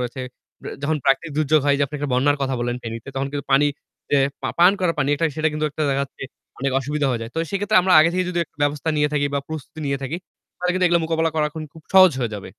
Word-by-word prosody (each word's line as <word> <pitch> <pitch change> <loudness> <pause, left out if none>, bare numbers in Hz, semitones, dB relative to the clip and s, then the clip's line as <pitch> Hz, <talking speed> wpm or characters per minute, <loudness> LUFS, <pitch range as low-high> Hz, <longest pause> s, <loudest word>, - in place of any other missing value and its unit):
রয়েছে। 125 +1 -4 0.6
যখন 155 +2 0
প্রাকৃতিক 145 +4 +1
দুর্যোগ 155 0 +3
হয় 140 0 +4
যে - - +2
আপনি 140 - -12
একটা 145 -1 -3
বন্যার 145 +3 +3
কথা 135 -1 -1
বললেন 120 0 -2
ফেনীতে 115 +2 -7
তখন 135 +1 -1
কিন্তু 145 -1 -4
পানি 140 +2 +5 0.4
যে - - +4 0.3
পা - - -1
পান 175 +3 +7
করা 180 -2 +2
পানি 145 -1 +1 0.3
সেটা 155 0 +2
কিন্তু 155 0 -2
একটা 155 - -4
দেখাচ্ছে 140 0 -3 0.4
অনেক 135 +1 -1
অসুবিধা 145 +2 -1
হয়ে 120 -2 -2
যায়। 115 - -7
তো - - -2
সেক্ষেত্রে 200 0 +1
আমরা 185 0 +2
আগে 160 +2 +4
থেকে 185 +1 0
যদি 175 - -2
একটা - - -41
ব্যবস্থা 145 +2 0
নিয়ে 150 0 +2
থাকি 145 -1 +1
বা 140 - +1
প্রস্তুতি 155 0 -7
নিয়ে 140 0 -1
থাকি, 135 +5 -3 0.4
তাহলে 180 0 0
কিন্তু 185 0 +1
এগুলা 170 -1 +3
মোকাবিলা 160 0 0
করা 155 -1 +1
এখন 160 0 -7
খুব 160 - -14
সহজ 185 -2 +8
হয়ে 120 -3 -2
যাবে। 100 - -7
150 Hz, 250 wpm, -22 LUFS, 135-160 Hz, 0.6 s, সহজ